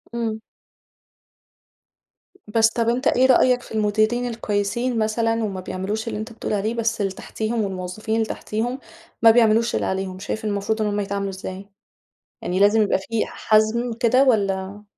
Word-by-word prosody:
إمم. 225 Hz, -2 st, -2 dB, 2.1 s
بس، 225 Hz, +1 st, +3 dB
طَب 230 Hz, 0 st, 0 dB
أنت 250 Hz, +3 st, 0 dB
إيه 255 Hz, -, +4 dB
رأيك 255 Hz, -1 st, +4 dB
في -, -, -15 dB
المديرين 215 Hz, +3 st, +1 dB
الكويسين 230 Hz, +1 st, -1 dB
مثلًا، 225 Hz, +1 st, 0 dB
وما 195 Hz, -3 st, -3 dB
بيعملوش 205 Hz, +5 st, -4 dB
اللي 230 Hz, -, -3 dB
أنت 220 Hz, +2 st, -6 dB
بتقول 225 Hz, -, -4 dB
عليه 210 Hz, +2 st, 0 dB
بس 230 Hz, -1 st, -1 dB
اللي 195 Hz, -1 st, 0 dB
تحتيهم، 220 Hz, +4 st, -3 dB
والموظفين 195 Hz, +2 st, -3 dB
اللي 225 Hz, 0 st, +1 dB
تحتيهم 230 Hz, +4 st, -3 dB, 0.4 s
ما 225 Hz, -, +8 dB
بيعملوش 230 Hz, 0 st, +3 dB
اللي -, -, 0 dB
عليهم، 190 Hz, -1 st, -3 dB
شايف 220 Hz, +2 st, -4 dB
إن -, -, 0 dB
المفروض 205 Hz, +2 st, -1 dB
إن 215 Hz, -, +1 dB
هُم 205 Hz, 0 st, -1 dB
يتعاملوا 200 Hz, 0 st, -2 dB
إزاي؟ 190 Hz, +1 st, -7 dB, 0.7 s
يعني 180 Hz, +1 st, -2 dB
لازم 205 Hz, +2 st, +5 dB
يبقى 210 Hz, -, +2 dB
في 220 Hz, +3 st, -2 dB
حَزم 220 Hz, +3 st, +1 dB
كده 255 Hz, +2 st, +4 dB
والّا؟ 200 Hz, -4 st, 0 dB
220 Hz, 160 wpm, -22 LUFS, 200-230 Hz, 2.1 s, ما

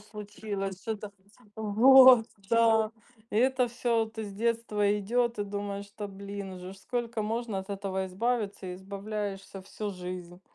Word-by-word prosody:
случилось? 205 Hz, -2 st, -6 dB
Что 220 Hz, -1 st, -2 dB
та" 205 Hz, 0 st, -8 dB, 0.5 s
Вот, 240 Hz, +3 st, +7 dB, 0.2 s
да. 225 Hz, -1 st, +4 dB, 0.4 s
И -, -, -2 dB
это 255 Hz, +1 st, +3 dB
всё 235 Hz, -1 st, +1 dB
вот 220 Hz, 0 st, -13 dB
из 205 Hz, -2 st, -4 dB
детства 210 Hz, -2 st, +1 dB
идёт, 235 Hz, +3 st, 0 dB
и 205 Hz, -, 0 dB
думаешь: 200 Hz, 0 st, -5 dB
"Да 205 Hz, -1 st, -4 dB
блин, 200 Hz, 0 st, -7 dB
уже 180 Hz, +1 st, -8 dB
ж 195 Hz, -, -13 dB
сколько 235 Hz, +1 st, -3 dB
можно 225 Hz, -1 st, -2 dB
от 190 Hz, +1 st, -7 dB
этого 190 Hz, -1 st, -2 dB
избавиться", 200 Hz, -2 st, -2 dB
избавляешься 195 Hz, 0 st, -5 dB
всю 205 Hz, +2 st, -5 dB
жизнь. 180 Hz, -1 st, -7 dB
205 Hz, 150 wpm, -29 LUFS, 195-230 Hz, 0.5 s, Вот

